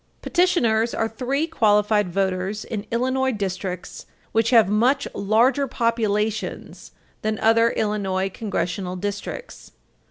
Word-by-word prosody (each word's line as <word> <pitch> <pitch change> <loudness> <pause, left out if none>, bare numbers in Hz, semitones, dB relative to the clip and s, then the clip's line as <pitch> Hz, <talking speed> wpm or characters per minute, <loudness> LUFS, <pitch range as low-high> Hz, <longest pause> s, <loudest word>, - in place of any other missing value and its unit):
These 240 -11 +2
are 225 - 0
three 265 +6 -1
qualified 210 - +2
voters 190 +2 -1
in 210 -1 -5
Illinois 260 +2 +1
districts 190 -4 -5 0.2
which 225 0 +2
have 230 -6 +6
much 240 +7 +2
larger 245 +7 +2
populations 220 -3 -2 0.3
than 215 0 -1
other 230 +1 +4
Illinois 200 -4 -1
Congressional 185 -3 -3
districts. 205 - -6
215 Hz, 105 wpm, -23 LUFS, 200-235 Hz, 0.3 s, have